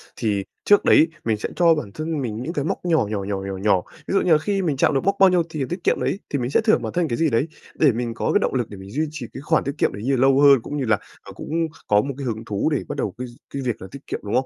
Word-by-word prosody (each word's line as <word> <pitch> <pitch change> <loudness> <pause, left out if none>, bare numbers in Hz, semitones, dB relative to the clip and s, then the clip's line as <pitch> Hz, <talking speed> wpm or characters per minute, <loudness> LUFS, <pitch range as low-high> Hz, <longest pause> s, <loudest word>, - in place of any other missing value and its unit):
thì 105 -4 -1 0.2
trước 205 - +4
đấy 160 - +6 0.2
mình 110 -2 +1
sẽ - - -4
cho 170 -2 +5
bản 150 -10 -5
thân 155 +2 -3
mình 115 -3 -4
những 160 +7 -4
cái 145 -3 -2
mốc 165 - -3
nhỏ, 160 -9 +3
nhỏ, 105 -2 -2
nhỏ, 100 0 -2
nhỏ, 95 -1 -4
nhỏ. 95 -2 +2 0.3
Ví - - -2
dụ 195 - +3
như 180 - +1
là 155 - +7
khi 195 +5 -1
mình 155 -7 -1
chạm 140 - +3
được 135 - 0
mốc 195 +2 +2
bao 195 -1 +7
nhiêu 180 -2 +3
thì 155 -3 -3
tiết 175 +1 -5
kiệm - - +2
đấy, 195 - -1
thì 145 - -1
mình 120 0 -2
sẽ - - +3
thưởng 220 0 +3
bản - - -4
thân 175 -2 +1
cái 120 - -2
gì 165 -1 +2
đấy 135 +5 +1 0.3
để 150 -4 +4
mình 120 0 -3
có - - -1
cái - - +4
động - - -1
lực 125 -4 -1
để 100 - -9
mình 95 +1 -11
duy 155 +6 -1
trì 155 -6 -6
cái 135 - -7
khoản 155 +2 +1
tiết 140 +2 -4
kiệm - - +1
đấy 100 - -7
như 135 +3 +1
là 125 - 0
lâu 135 0 +5
hơn, 140 -3 +7
cũng 145 +5 -5
như 135 - -1
là, 110 -2 +3 0.2
ờ, - - -12
cũng - - -9 0.4
có 105 0 +4
một 140 +5 -4
cái 140 - -5
hứng 115 -2 -4
thú 105 +7 -1
để 145 -4 0
bắt 145 - -5
đầu 105 -8 -2
cái 125 +1 -5 0.3
cái 140 - -3
việc 125 -4 -3
là 95 - -7
tiết 140 0 -11
kiệm, - - -3
đúng 105 - -4
không? 130 +1 +2
135 Hz, 335 wpm, -22 LUFS, 115-160 Hz, 0.4 s, là